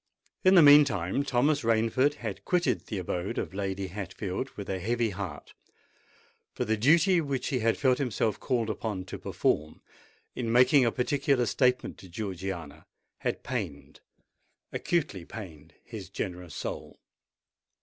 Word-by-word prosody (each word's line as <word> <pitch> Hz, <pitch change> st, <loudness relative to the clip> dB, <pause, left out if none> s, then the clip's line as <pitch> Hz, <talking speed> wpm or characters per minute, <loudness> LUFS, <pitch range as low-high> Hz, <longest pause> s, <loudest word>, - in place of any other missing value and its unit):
In 185 Hz, +1 st, +6 dB
the 170 Hz, -, +9 dB
meantime, 140 Hz, -, +5 dB
Thomas 140 Hz, +2 st, +2 dB
Rainford 115 Hz, +5 st, +2 dB
had 110 Hz, -8 st, -6 dB
quitted 175 Hz, -8 st, 0 dB
the 105 Hz, -, -4 dB
abode 90 Hz, 0 st, -3 dB
of -, -, -3 dB
Lady 95 Hz, 0 st, -3 dB
Hatfield 95 Hz, +5 st, -4 dB
with 100 Hz, -, -6 dB
a 95 Hz, -1 st, -2 dB
heavy 115 Hz, +3 st, 0 dB
heart: 95 Hz, -6 st, -7 dB, 1.0 s
for -, -, -1 dB
the 110 Hz, -, +1 dB
duty 165 Hz, -, +4 dB
which 140 Hz, -4 st, -2 dB
he 130 Hz, -, 0 dB
had 115 Hz, 0 st, +1 dB
felt 130 Hz, -2 st, +2 dB
himself 115 Hz, -5 st, -1 dB
called 115 Hz, -4 st, 0 dB
upon 100 Hz, -3 st, -4 dB
to -, -, -7 dB
perform, 75 Hz, +1 st, -1 dB, 0.5 s
in 115 Hz, -3 st, -3 dB
making 125 Hz, +2 st, +5 dB
a 115 Hz, -, +2 dB
particular 135 Hz, 0 st, +1 dB
statement 125 Hz, +2 st, +1 dB
to 95 Hz, -, -13 dB
Georgiana, 90 Hz, -6 st, -6 dB, 0.3 s
had -, -, -3 dB
pained—acutely 100 Hz, -, -5 dB
pained 80 Hz, -6 st, -10 dB
his 105 Hz, -5 st, -9 dB
generous 90 Hz, -5 st, -5 dB
soul. -, -, -6 dB
110 Hz, 140 wpm, -28 LUFS, 95-130 Hz, 1.0 s, the